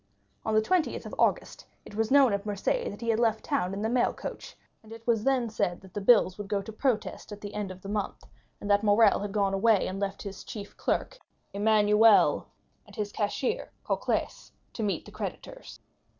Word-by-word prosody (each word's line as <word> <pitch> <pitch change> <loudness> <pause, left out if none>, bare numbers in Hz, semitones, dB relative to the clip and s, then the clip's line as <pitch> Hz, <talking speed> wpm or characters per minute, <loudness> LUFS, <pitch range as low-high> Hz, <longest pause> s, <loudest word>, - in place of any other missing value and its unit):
On 220 - -1
the 215 - +4
20th 350 +6 0
of - - -8
August - - 0 0.2
it - - -12
was 220 +1 0
known 270 -5 +5
at 200 0 -1
Marseilles 205 -2 -1
that 205 - -9
he 230 - -3
had 225 0 +2
left 225 -2 +1
town 275 -11 0
in 200 +2 -4
the - - +1
mailcoach, 240 +1 -2 0.3
and 220 - -17
then 225 - -7
it 230 - -30
was 225 -3 +1 0.3
said 175 -4 0
that 190 -1 -16
the 205 - -3
bills 200 -3 +4
would 205 - -5
go 205 0 0
to 200 +3 -7
protest 230 -2 -2
at 210 - -7
the 205 -1 -8
end 205 -2 -3
of 185 0 -10
the - - -7
month, 205 -1 -3 0.4
and - - -7
that 205 0 +4
Morrel 210 0 +4
had 205 0 -4
gone 200 -1 +1
away 205 +1 +3
and 190 +1 -4
left 200 0 -3
his 200 -1 -7
chief 205 -2 -8
clerk - - -2 0.3
Emmanuel, 210 +1 +4 0.4
and - - -15
his 210 -3 -3
cashier 210 +4 -2
Cocles, - - -2 0.2
to - - -5
meet 205 -2 -1
the - - -12
creditors. - - -7
210 Hz, 205 wpm, -28 LUFS, 200-225 Hz, 0.4 s, known